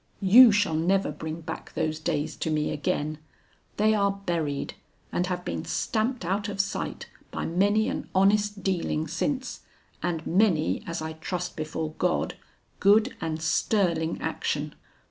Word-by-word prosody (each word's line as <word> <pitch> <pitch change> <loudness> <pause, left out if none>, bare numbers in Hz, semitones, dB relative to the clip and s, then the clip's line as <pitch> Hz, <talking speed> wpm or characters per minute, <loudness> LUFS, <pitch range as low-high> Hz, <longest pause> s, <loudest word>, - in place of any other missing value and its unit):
You 230 +5 +9
shall 205 -5 +2
never 180 +3 +2
bring 160 +2 -6
back 160 0 -7
those 155 0 -1
days 155 -2 -2
to - - -2
me 150 -1 0
again; 150 +1 -2 0.6
they 215 +1 +4
are 200 -2 +3
buried, 155 -5 -1 0.4
and 180 - 0
have 180 -1 -3
been - - -3
stamped 225 -1 -1
out 200 +4 -1
of 200 -1 -6
sight 195 - -2 0.2
by - - -4
many 205 +6 +2
an - - -4
honest 205 +1 +3
dealing 170 -4 0
since, 260 - -2 0.4
and 165 -2 -2
many 180 -2 +2
as 165 -1 -3
I 160 0 -4
trust 180 +2 -4
before 155 0 -3
God, 180 -1 0 0.4
good 215 +5 +4
and 160 -1 -2
sterling 165 -1 +1
action. - - -2
180 Hz, 145 wpm, -27 LUFS, 160-205 Hz, 0.6 s, You